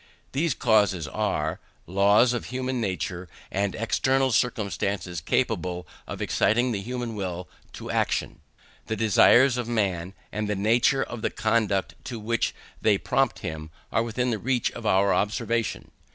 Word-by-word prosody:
These 145 0 0
causes 100 -8 +2
are, 80 -6 -1 0.3
laws 100 +6 +4
of 120 - -3
human 130 0 -2
nature, 90 -2 -3 0.2
and 100 0 -1
external 130 +4 +1
circumstances 100 -7 -1
capable 90 +3 -1 0.2
of - - -4
exciting 120 +4 +2
the 100 -4 -2
human 120 +1 -4
will 90 -3 -4 0.3
to - - -6
action. - - -1 0.5
The 110 - -1
desires 120 +4 +5
of 120 -2 -2
man, 95 -6 -1 0.2
and 105 0 -3
the 105 - 0
nature 115 +7 +3
of 120 - -7
the - - 0
conduct 110 -3 0
to 120 -3 -5
which 115 +2 -1 0.3
they 105 -2 +4
prompt 135 +5 0
him, 80 -2 -5 0.2
are - - +2
within 120 +2 -1
the 110 - -1
reach 125 +2 0
of 115 - -6
our 100 0 +4
observation. 115 +2 -1
110 Hz, 150 wpm, -26 LUFS, 95-120 Hz, 0.5 s, desires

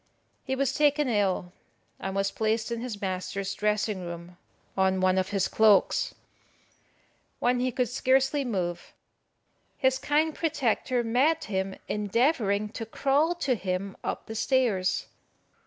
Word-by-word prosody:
He 265 - -2
was 270 -1 0
taken 295 -1 +3
ill, 195 -5 0 0.5
and 195 0 -4
was 195 0 +1
placed 220 +2 -1
in 230 -1 -2
his 235 -4 -5
master's 190 +1 -3
dressing 210 -1 0
room 170 0 -8 0.4
on 190 -1 +2
one 185 0 +3
of 185 +1 -1
his 195 -2 +1
cloaks. 215 -3 +3 1.2
When 245 0 +1
he 255 +1 0
could 250 +1 0
scarcely 265 +3 +2
move, 185 -8 -3 0.8
his 260 -1 +2
kind 305 +3 +1
protector 255 -6 0
met 280 +8 +2
him 190 -3 -2
endeavouring 210 -1 +1
to 225 +1 -6
crawl 285 +8 +1
to 260 - +3
him 190 -2 -3
up - - -3
the 220 - -7
stairs. 225 -6 +1
220 Hz, 135 wpm, -27 LUFS, 195-260 Hz, 1.2 s, taken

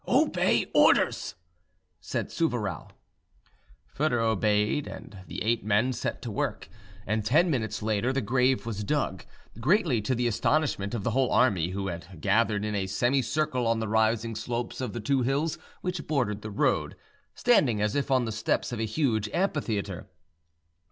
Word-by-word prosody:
"Obey - - +3
orders," - - +3 0.6
said - - -4
Souvarow. 120 - -2 1.0
Foedor 145 -4 0
obeyed, 110 +3 +1
and 100 - -9
the - - -5
eight 115 0 +1
men 110 +5 +2
set - - -4
to - - -4
work; - - -3 0.4
and 110 +2 -1
ten 160 - +3
minutes 110 -6 -2
later 110 +3 +1
the 135 - 0
grave 125 +2 +1
was 105 -3 -4
dug, 135 - -1 0.4
greatly 150 - +2
to 130 +5 -1
the 120 +1 -1
astonishment 120 -2 0
of 105 - -3
the 115 - 0
whole 130 +2 +1
army, 95 -10 +3
which 95 -4 -4
had 90 -3 -13
gathered 105 +3 +1
in 105 - -2
a 100 -2 -1
semicircle 125 +4 0
on 115 0 +1
the 110 - -2
rising 110 +1 +1
slopes 120 +3 -4
of 125 -5 -3
the 120 - -4
two 130 +5 +1
hills 140 +6 0 0.2
which 180 -3 -4
bordered 120 -9 0
the 110 - -6
road, 100 - 0 0.4
standing 145 - +3
as 105 0 0
if 140 -1 -1
on 130 -2 +3
the 110 - -3
steps 110 +3 -1
of 120 - -4
a 110 - 0
huge 110 -3 0
amphitheatre. 110 - -2
115 Hz, 165 wpm, -27 LUFS, 105-135 Hz, 1.0 s, Obey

